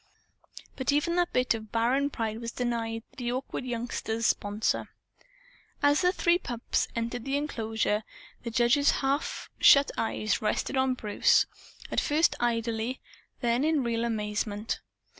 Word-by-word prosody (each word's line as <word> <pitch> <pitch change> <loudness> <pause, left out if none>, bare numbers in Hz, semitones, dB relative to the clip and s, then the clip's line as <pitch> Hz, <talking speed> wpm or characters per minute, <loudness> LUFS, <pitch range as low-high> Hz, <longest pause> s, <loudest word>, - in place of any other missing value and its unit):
But 260 +1 0
even 295 +4 +1
that 350 -1 +2
bit 250 -1 +2
of 220 -1 -7
barren 250 +5 +2
pride 225 -4 -3
was 230 0 -4
denied 230 -2 -2
the 245 -2 -2
awkward 255 0 -4
youngster's 230 -2 -3
sponsor. 205 +1 0 0.9
As 290 +3 +4
the 360 0 +4
three 350 -1 +2
pups 240 -7 -2
entered 235 +1 -3
the 275 +2 0
enclosure, 225 -6 -1 0.4
the 235 - -4
judge's 245 +4 +3 0.2
half 280 +3 -1
shut 280 0 +7
eyes 220 -1 0
rested 215 +5 -1
on 260 -1 +2
Bruce 210 -4 +3 0.5
at - - +2
first 305 +3 +3
idly, 230 +1 -1 0.4
then 240 +1 +1
in 310 -3 +2
real 235 -1 -1
amazement. 210 -1 -2
235 Hz, 140 wpm, -28 LUFS, 225-275 Hz, 0.9 s, shut